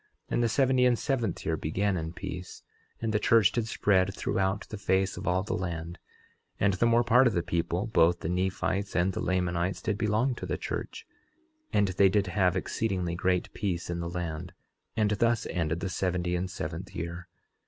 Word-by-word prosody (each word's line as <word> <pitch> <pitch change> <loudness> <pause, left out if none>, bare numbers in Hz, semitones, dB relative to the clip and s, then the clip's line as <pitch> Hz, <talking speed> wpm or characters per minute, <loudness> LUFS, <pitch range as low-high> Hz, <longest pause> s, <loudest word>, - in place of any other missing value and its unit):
And - - +2
the 120 - +2
seventy 130 +2 +3
and 125 -1 +4
seventh 120 - -1
year 80 - +1
began 95 +6 0
in 80 -1 -3
peace; 90 +1 -7 0.4
and 110 -1 0
the 105 - +2
church 115 -5 +5
did 115 -2 -1
spread 95 -3 +2
throughout 95 +1 -1
the 110 - -5
face 95 0 +1
of - - -6
all 90 +1 +2
the 105 - -3
land; 85 -1 -4 0.6
and 100 -1 +3
the 105 +6 +2
more 115 +1 +4
part 125 +2 +5
of 115 - +1
the 85 -3 0
people, 85 +3 -1
both 85 -6 +3
the - - -3
Nephites 95 +2 -1
and 90 +2 +2
the - - -3
Lamanites, 90 0 0
did 105 -2 -2
belong 110 +4 +1
to - - -6
the - - -1
church; - - -5 0.7
and 100 -1 +3
they 95 +1 +4
did 100 +1 +2
have 90 -1 +1
exceedingly 95 -6 -1
great 90 +1 0
peace 90 -4 -2
in 85 - -2
the 85 0 -3
land; 85 -1 -4 0.4
and 105 -1 +2
thus 115 +2 +2
ended 80 -1 -1
the 95 - -1
seventy 90 -1 -1
and 90 +1 -2
seventh 90 +3 -6
year. 85 0 -5
95 Hz, 195 wpm, -29 LUFS, 85-105 Hz, 0.7 s, church